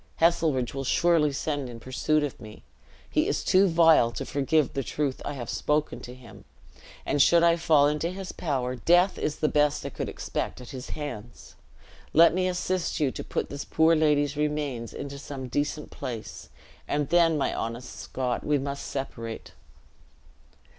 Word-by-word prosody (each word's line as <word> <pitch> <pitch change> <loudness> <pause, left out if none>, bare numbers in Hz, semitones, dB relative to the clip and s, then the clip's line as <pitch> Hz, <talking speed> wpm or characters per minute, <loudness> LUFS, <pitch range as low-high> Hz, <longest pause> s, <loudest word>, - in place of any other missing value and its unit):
Heselrigge 160 -7 +2
will 135 0 -3
surely 160 +1 +3
send 145 -1 -3
in 115 -1 -9
pursuit 150 +5 0
of 145 - -4
me. 105 -1 -12 0.4
He - - +1
is - - -1
too 190 +1 +4
vile 165 -7 +5
to - - -4
forgive 145 0 +1
the 135 - -1
truth 140 +1 -2
I - - -4
have 125 -4 -6
spoken 150 0 -1
to 125 - -10
him; 125 -3 -14 0.6
and 145 - +2
should 170 +4 +5
I 170 0 +5
fall 155 -4 +4
into 150 +3 -1
his 185 0 -6
power, 130 -5 -2
death 175 - +3
is 150 - -1
the 155 - 0
best 150 -1 +1
I - - -2
could - - -5
expect - - -4
at 125 - -10
his 130 -1 -8
hands. 120 -6 -8 0.6
Let 165 +1 +7
me 185 +1 +1
assist 180 0 -1
you 145 -4 +2
to - - -6
put - - -3
this 140 0 -5
poor 160 +1 +3
lady's 150 -2 +2
remains 150 -6 -2
into 140 0 -7
some 135 -2 -7
decent 145 +3 -2
place; 115 -3 -7 0.4
and 145 -1 -1
then, 170 -2 +4
my 140 - 0
honest 115 +2 -5
Scot, 125 -1 -3
we 150 -1 +2
must 140 0 -4
separate." 115 -4 -6
145 Hz, 175 wpm, -27 LUFS, 130-160 Hz, 0.6 s, Let